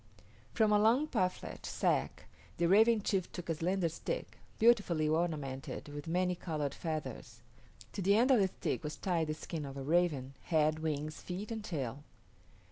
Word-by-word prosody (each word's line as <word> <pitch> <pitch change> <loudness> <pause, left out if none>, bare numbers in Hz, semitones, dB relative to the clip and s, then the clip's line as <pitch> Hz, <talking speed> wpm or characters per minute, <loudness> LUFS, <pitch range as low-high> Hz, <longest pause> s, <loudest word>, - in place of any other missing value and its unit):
From 220 -2 +3
a 210 - +5
long 230 +7 +4
parfleche 185 -10 -2
sack - - 0 0.3
the 170 - +2
Raven 215 +3 +5
chief 190 -4 0
took 175 -2 -7
a - - +3
slender 175 +3 0
stick, 165 - -5 0.2
beautifully 205 -9 +4
ornamented 150 -4 -2
with 145 +1 -7
many 180 +2 +1
colored 155 -5 -3
feathers. 155 -2 -5 0.5
To 200 - -3
the 200 +2 +4
end 245 +5 +4
of 250 - +6
the 195 - +4
stick 180 - -3
was 150 0 -4
tied 170 -4 0
the 155 - -2
skin 160 0 -5
of 135 -1 -7
a 135 - -4
raven 150 -4 +1
head, 155 -2 +2
wings, 155 -1 -3
feet, 195 +5 -5
and 220 -2 -4
tail. 140 - -4
170 Hz, 170 wpm, -33 LUFS, 155-195 Hz, 0.5 s, of